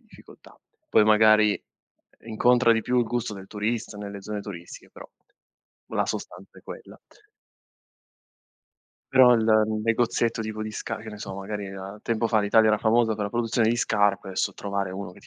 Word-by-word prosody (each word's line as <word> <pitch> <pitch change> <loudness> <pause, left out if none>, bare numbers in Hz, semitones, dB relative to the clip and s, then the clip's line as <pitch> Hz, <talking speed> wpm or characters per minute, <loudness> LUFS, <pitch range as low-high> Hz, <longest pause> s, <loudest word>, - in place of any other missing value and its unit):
difficoltà. - - -18 0.3
Poi 110 - +4
magari 110 0 +4 0.6
incontra 120 +2 +3
di 115 - +1
più 125 +3 0
il 120 - +2
gusto 115 -1 -3
del 95 -1 -10
turista 110 +2 -4
nelle 100 -1 -8
zone 105 +1 -5
turistiche 90 -4 -10
però - - -13 0.8
la - - -1
sostanza - - -7
è - - -19
quella. - - -11 2.1
Però 130 -2 +7
il 115 -2 +1 0.4
negozietto 115 0 0
tipo 110 0 -6
di 110 - -5
sca 115 +1 -5
che 110 +1 -10
ne 105 -1 -9
so, 100 -2 -7
magari 100 0 -6
a 95 +2 -9
tempo 115 -1 -1
fa 110 -1 +2
l'Italia 110 +2 +4
era 105 -1 +2
famosa 110 0 +2
per 105 -1 -3
la 100 - -4
produzione 115 -1 0
di 120 - +1
scarpe, 105 -4 +1
adesso 95 - -2
trovare 100 -1 -3
1 95 -1 -7
che - - -17
ti - - -19
110 Hz, 175 wpm, -25 LUFS, 100-115 Hz, 2.1 s, Però